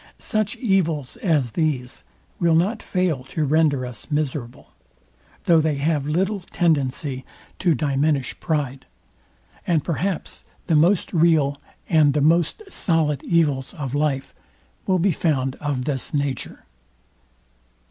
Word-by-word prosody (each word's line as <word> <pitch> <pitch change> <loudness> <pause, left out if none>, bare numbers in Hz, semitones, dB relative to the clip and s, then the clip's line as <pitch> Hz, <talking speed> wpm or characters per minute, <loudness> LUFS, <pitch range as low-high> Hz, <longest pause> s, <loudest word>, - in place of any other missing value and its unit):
Such 215 -2 -1
evils 170 - 0
as 155 - +1
these 135 -5 -2 0.4
will 170 -1 +3
not 200 +7 +1
fail 180 -8 -1
to 150 +3 -2
render 145 -3 +2
us 125 +1 -9
miserable, 145 -5 -3 0.7
though 165 -2 +5
they 155 -1 +1
have 145 0 0
little 190 +7 0
tendency 140 -4 0 0.4
to 175 -4 +3
diminish 140 0 0
pride: 140 -5 -2 0.8
And 165 -5 +2
perhaps 180 +2 -3 0.2
the 165 - +2
most 170 +7 +3
real 155 -4 +3 0.3
and 155 -4 +4
the - - +3
most 165 - +2
solid 160 - 0
evils 150 -4 +1
of 140 -6 -5
life 145 -2 -1 0.5
will 185 - +3
be 185 +2 +2
found 135 -5 0
of 140 -4 -2
this 140 -1 -2
nature. 140 -3 -3
155 Hz, 125 wpm, -22 LUFS, 140-170 Hz, 0.8 s, though